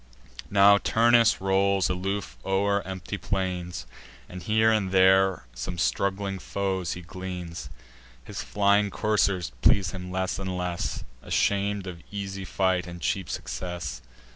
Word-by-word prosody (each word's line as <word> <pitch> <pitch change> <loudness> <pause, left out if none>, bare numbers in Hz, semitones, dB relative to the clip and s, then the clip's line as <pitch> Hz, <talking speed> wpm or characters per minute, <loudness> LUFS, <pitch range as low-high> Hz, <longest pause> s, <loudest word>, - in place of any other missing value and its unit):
Now 100 0 +6
Turnus 115 +1 +4
rolls 95 0 +2
aloof 95 +1 -3
o'er 100 +1 +1
empty 95 +1 -5
plains, 90 -6 -3 0.4
And 90 0 -8
here 110 +3 +3
and 105 -4 +1
there 95 -4 +4
some 75 +9 -5
straggling 95 +3 0
foes 95 -2 -2
he 90 - -8
gleans. 90 -1 -6 0.5
His - - -6
flying 100 0 +2
coursers 100 - +1
please 95 -3 +4
him 90 -1 -7
less 95 0 -1
and 95 -1 -3
less, 90 -1 -3 0.2
Asham'd 100 0 0
of 90 -3 -7
easy 100 -1 -5
fight 95 -1 0
and 85 0 -8
cheap 95 -2 -1
success. 75 -2 -5
95 Hz, 130 wpm, -26 LUFS, 90-100 Hz, 0.5 s, Now